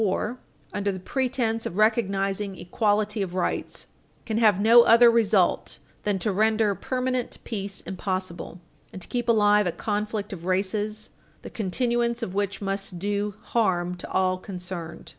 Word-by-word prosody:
561 210 +3 0
war - - -24 0.3
under 200 0 0
the 185 - -6
pretence 235 +1 -1
of 175 - -7
recognizing 195 -3 +1
equality 210 +2 0
of 185 -2 -3
rights, 185 - -2 0.4
can 220 -1 -1
have 210 -4 +4
no 230 +3 +8
other 235 0 +7
result 210 -5 +2 0.3
than 205 -2 +1
to 195 +3 -1
render 215 +1 +2
permanent 255 +2 -2
peace 200 -3 -4
impossible 185 -2 -4 0.3
and 190 - -8
to - - -12
keep 240 -1 -2
alive 210 -3 +4
a - - +1
conflict 210 +1 -3
of 170 -3 -8
races 205 +3 -1 0.3
the - - -8
continuance 235 +3 0
of 185 - -4
which 200 0 -2
must 195 -2 -3
do 205 +2 -2
harm 180 -6 0
to 175 - -9
all 185 -1 +1
concerned. 180 -4 -7
205 Hz, 155 wpm, -25 LUFS, 190-225 Hz, 0.4 s, no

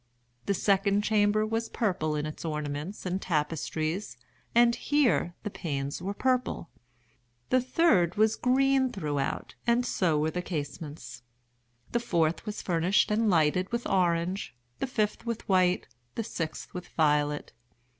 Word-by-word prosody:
The 200 - +2
second 200 +1 +2
chamber 215 0 +3
was 225 +1 -2
purple 180 -8 0
in 150 0 -1
its 155 - -6
ornaments 150 +4 -4
and 185 +1 -1
tapestries, 160 +2 -2 0.4
and 235 0 +6
here 255 - +1
the 210 - -4
panes 140 -3 -3
were 195 +3 -3
purple. 255 -7 0 0.8
The 255 - +4
third 245 - +3
was 220 +1 +3
green 265 0 +3
throughout, 145 - -3
and 240 +1 +3
so 175 -9 +1
were 155 +1 +1
the 180 - -2
casements. 145 -5 -6 0.7
The 235 - +1
fourth 170 -5 0
was 210 - -4
furnished 180 +4 +2
and 220 +1 +2
lighted 175 +2 +2
with 235 0 -2
orange—the 170 - -1
fifth 215 -1 -1
with 230 -2 -3
white—the 180 - 0
sixth 165 -7 -5
with 180 -1 -6
violet. 150 -2 +1
185 Hz, 135 wpm, -28 LUFS, 155-220 Hz, 0.8 s, and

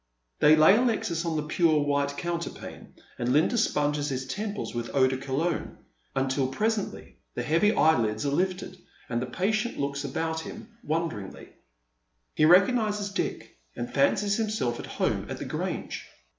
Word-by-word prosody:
They 150 +1 +7
lay 155 +7 +7
Alexis 215 -9 0
on 165 -1 -1
the 155 - -1
pure 155 0 +2
white 145 0 0
counterpane, 170 -1 -5 0.2
and 120 +1 0
Linda 155 - +3
sponges 150 -9 +1
his 130 -1 -3
temples 205 +9 -4
^vith 120 -1 -3
eau 135 -1 +5
de 130 0 +1
Cologne, 140 +6 -2 0.4
until 135 0 +1
presently 210 +10 -2 0.2
the - - -2
heavy 170 +7 +3
eyelids 115 -8 +2
are 140 - +1
lifted, 185 +3 -1 0.3
and 120 -1 -1
the 125 - -3
patient 215 - -1
looks 140 0 -2
about 160 +4 -2
him 220 +7 -9
won 165 +2 0
deringly. 105 -9 -9 0.8
He 155 - +3
recognises 205 +3 +4
Dick, 190 - -4 0.2
and 120 - -5
fancies 200 +9 +2
himself 215 - -1
at - - -7
home - - -1
at - - -4
the - - -6
Grange. - - -4
155 Hz, 155 wpm, -27 LUFS, 135-200 Hz, 0.8 s, They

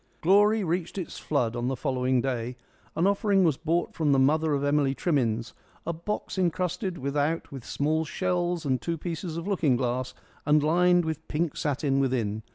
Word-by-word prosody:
Glory 205 +4 +4
reached 175 +1 -2
its 185 - -5
flood 125 -6 0
on 120 +1 -2
the 130 - 0
following 130 0 0
day. 125 -1 -3 0.4
An 165 - +2
offering 200 -1 +3
was 160 -5 +3
brought 165 +3 -1
from 155 -3 +1
the - - +4
mother 150 +3 +3
of 140 - -2
Emily 145 -1 +2
Trimmins 120 -9 0 0.3
a 170 - -1
box 190 +3 -4
encrusted 180 +1 -1
without 145 +4 -1
with 135 -4 -8
small 155 +5 0
shells 175 0 -1
and 130 -3 0
two 165 +6 -2
pieces 165 0 -5
of 170 +3 -5
looking 165 -10 +2
glass 125 0 -2 0.3
and 150 0 +3
lined 175 +2 +4
with 160 0 -4
pink 155 0 -1
satin 140 -1 0
within. 115 -6 0
155 Hz, 175 wpm, -27 LUFS, 135-175 Hz, 0.4 s, Glory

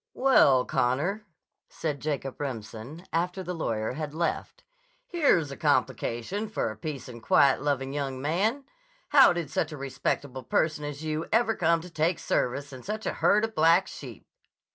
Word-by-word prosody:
"Well, 140 - +5
Connor," 175 - 0 0.4
said 150 -3 -3
Jacob 140 -3 -4
Remsen 125 - -6
after 180 +3 -1
the 180 0 -4
lawyer 110 -10 -2
had 150 +1 -5
left, 170 - -3 0.4
"here's 280 - +2
a - - -5
complication 190 - -1
for 160 - -2
a - - -8
peace 140 +4 -6
and 120 -2 -10
quiet 135 +3 +4
loving 135 -2 -1
young 135 -2 -3
man! 195 - 0 0.5
How 275 -3 +7
did 170 -4 -3
such 155 +3 -1
a 150 - -6
respectable 135 0 -3
person 150 +5 0
as 145 +1 -6
you 155 +1 -2
ever 225 0 +3
come 165 -1 +2
to 180 - -10
take 165 +2 +1
service 140 +3 -1
in 130 - -9
such 215 +6 -5
a - - -1
herd 210 +2 +3
of 225 - -8
black 165 +3 +4
sheep?" - - -10
155 Hz, 165 wpm, -27 LUFS, 135-180 Hz, 0.5 s, How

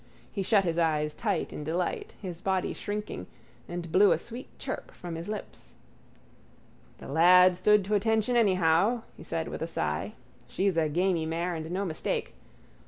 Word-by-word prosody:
He 200 - -3
shut 200 +1 +3
his 170 -2 0
eyes 150 -2 +1
tight - - -2
in 150 - -5
delight, 170 +4 -2
his 180 -4 -7
body 190 -1 0
shrinking, 210 +1 -5 0.4
and 175 -1 -5
blew 200 +4 +6
a - - 0
sweet 240 +3 -8
chirp - - -5
from 175 -1 -8
his 165 +1 -6
lips. 215 -1 -7 1.2
—The - - -10
lad 180 +5 +6
stood 210 +2 +4
to 210 - -2
attention 220 +3 +2
anyhow, 195 +1 +3
he - - -13
said - - -3
with - - -6
a - - -1
sigh. - - -2 0.3
She's 195 -1 0
a 160 -2 +2
gamey 170 0 +1
mare 170 +2 -1
and 160 -1 -5
no 190 +3 -1
mistake. 160 -4 -3
180 Hz, 170 wpm, -28 LUFS, 165-205 Hz, 1.2 s, blew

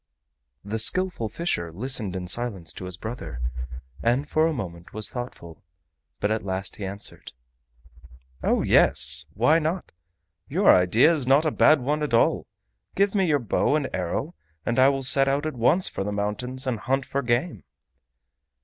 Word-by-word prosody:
The 110 +2 -3
Skillful 180 -3 +1
Fisher 100 - -3
listened 110 0 -1
in 90 -1 -5
silence 100 -4 -2
to 95 - -8
his 90 -1 -7
brother, 90 - -7 0.6
and 125 +5 +1
for 155 +1 +2
a - - 0
moment 90 - -7
was 110 0 -1
thoughtful, 120 - -8 0.6
but 100 - 0
at 110 0 -1
last 95 0 -3
he 105 - -7
answered: 100 +2 -7 1.1
"O - - +1
yes, 70 +1 +4
why 150 +9 +4
not? 165 +4 -3 0.6
Your 185 +8 +5
idea 105 - +4
is 145 -6 -3
not 140 +4 +4
a 155 - +1
bad 155 -1 +4
one 150 +4 -1
at 150 -6 0
all. - - +2 0.5
Give 200 0 +2
me 195 -3 +2
your 150 -3 +3
bow 125 +3 0
and 150 -3 -1
arrow 90 -2 -3 0.3
and 120 +2 0
I 130 +1 +6
will 135 -1 -2
set 135 +1 +5
out 140 +2 0
at 155 - -2
once 130 +10 +3
for - - -3
the 105 - -3
mountains 105 +6 -3
and 125 -4 -2
hunt 135 +3 -1
for 140 - -2
game." 120 - -1
120 Hz, 170 wpm, -25 LUFS, 100-145 Hz, 1.1 s, I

